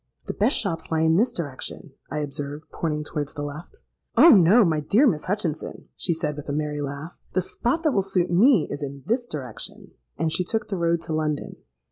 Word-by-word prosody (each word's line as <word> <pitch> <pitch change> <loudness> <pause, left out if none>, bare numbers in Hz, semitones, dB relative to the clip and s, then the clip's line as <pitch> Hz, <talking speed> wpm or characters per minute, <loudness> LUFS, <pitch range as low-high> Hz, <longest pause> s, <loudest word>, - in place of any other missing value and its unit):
'The - - -4
best 225 +8 +2
shops 165 -7 -2
lie 160 -1 +2
in 160 0 +4
this 230 +8 +3
direction,' 150 +1 -6 0.2
I 150 - -2
observed, 145 +1 -5
pointing 150 -2 -2
towards 150 0 -4
the 145 - -4
left.—'Oh! 155 - +1
no, 200 - +7
my 160 -3 +1
dear 205 - +3
Miss 170 - +1
Hutchinson,' 185 -6 -3
she 180 - 0
said, 160 -2 -2
with 150 0 -8
a - - -1
merry 150 0 -2
laugh: 145 +4 -6
'the 185 - +2
spot 290 - -1
that 310 - +3
will 200 - +2
suit 185 -2 0
me 210 - +5
is 145 - -5
in 140 -1 -6
this 240 +2 0
direction;'—and 125 - -6
she 180 - +1
took 220 +5 -2
the 200 - -1
road 170 -1 +1
to 165 - -5
London. 155 -1 -2
160 Hz, 200 wpm, -24 LUFS, 150-195 Hz, 0.2 s, no